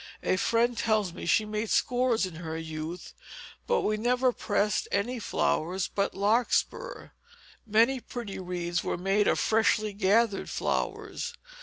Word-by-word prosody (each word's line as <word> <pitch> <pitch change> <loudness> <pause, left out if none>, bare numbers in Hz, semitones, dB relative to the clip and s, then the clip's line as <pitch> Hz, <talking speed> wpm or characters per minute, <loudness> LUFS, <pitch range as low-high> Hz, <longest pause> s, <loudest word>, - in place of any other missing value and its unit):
A - - +2
friend 235 +5 +2
tells 215 -5 +1
me 175 - -7
she 215 - +3
made 215 +1 -3
scores 245 -4 +2
in 175 -4 -8
her 160 -1 -5
youth; 160 +2 -6 0.5
but 485 - +2
we 215 0 0
never 250 +3 +2
pressed 210 -3 0
any 235 +5 0
flowers 185 -3 0
but 200 -2 -1
larkspur. 235 - 0 0.6
Many 230 +5 +3
pretty 235 -5 -7
wreaths 175 -2 -2
were - - -2
made 195 +3 +1
of - - +3
freshly 215 -1 +2
gathered 205 +1 +2
flowers. - - -2
210 Hz, 140 wpm, -28 LUFS, 185-230 Hz, 0.6 s, she